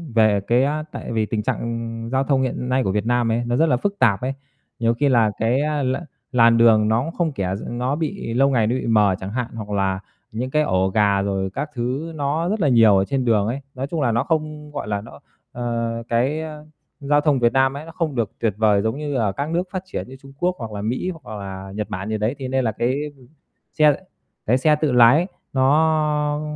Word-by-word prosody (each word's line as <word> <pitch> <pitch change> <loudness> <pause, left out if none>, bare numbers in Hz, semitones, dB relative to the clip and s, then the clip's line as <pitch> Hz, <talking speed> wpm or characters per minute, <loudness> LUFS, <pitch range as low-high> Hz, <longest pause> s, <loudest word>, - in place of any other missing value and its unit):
về 110 -3 +4
cái, 120 +2 +3
a 150 +2 -1
tại - - -6
vì 110 -2 +1
tình 105 0 -2
trạng, - - -1
ừm, 115 0 -4
giao 130 +1 +1
thông 135 -1 +1
hiện 125 -1 -2
nay 130 +1 +2
của 95 - 0
Việt 105 +2 -1
Nam 120 -1 +1
ấy, 115 +2 0
nó 120 0 0
rất 160 - +4
là 125 - +3
phức 200 +8 -3
tạp 105 -5 +3
ấy. 130 +2 -2 0.5
Nhiều 115 0 +2
khi 140 +4 +1
là 115 -4 +3
cái, 120 +5 +2
a, 150 -1 -1
l 130 0 +1 0.4
làn 115 -2 +5
đường 110 -2 +5
nó 110 +2 +2
cũng 165 - -4
không 170 -2 -1
kẻ 95 -5 -2
gi 100 - -7
nó 125 +4 -1
bị 160 -5 -3
lâu 135 +3 +3
ngày 115 -5 +2
nó 120 - 0
bị 130 - -3
mờ 105 -4 +4
chẳng 95 +1 -6
hạn, 125 0 -2
hoặc 110 -2 -7
là 95 -2 0 0.3
những 125 +4 -3
cái 155 +1 +3
ổ 95 -5 +1
gà 100 0 +2
rồi 95 -1 -1
các 140 +10 -4
thứ 130 +7 -3
nó 150 +4 -1
rất 215 +2 -1
là 150 - +3
nhiều 115 -5 +6
ở 95 - +2
trên 130 +3 -1
đường 105 -4 +2
ấy. 130 +5 -3
Nói 135 +2 -3
chung 160 -1 -3
là 120 - +2
nó 115 - +1
không, 155 -2 -3
gọi 145 -6 -5
là, 100 -1 -2
nó, 75 -9 -13 0.3
ờ, 115 -1 -3
cái, 130 +7 +1
ơ, 155 -1 -8 0.3
giao 145 +1 +2
thông 145 -3 +2
Việt 120 -1 +3
Nam 135 0 +3
ấy 150 - -8
nó 165 - -10
không 160 -4 -2
được 115 -4 -1
tuyệt 110 -3 0
vời 105 -2 +3
giống 110 +4 -1
như, 150 -1 -4
ờ, 110 -5 +1
các 140 +9 -4
nước 170 +2 0
phát 185 -1 -4
triển 185 - -5
như 130 - -10
Trung 135 +1 -15
Quốc 180 +1 +1
hoặc 105 -3 -6
Mỹ 125 - -2
hoặc 105 0 -7
là 95 0 -7
Nhật 105 0 -3
Bản 95 +3 -4
gì 110 - -1
đấy. 110 +5 -1
Thế 130 - -4
nên 130 0 0
là 110 - +1
cái 120 +5 -1 0.8
xe 150 -2 +5 0.5
cái 125 +4 +3
xe 150 +3 +3
tự 150 -1 0
lái 125 +8 +6 0.3
nó 150 +2 +2
125 Hz, 250 wpm, -22 LUFS, 110-145 Hz, 0.8 s, nhiều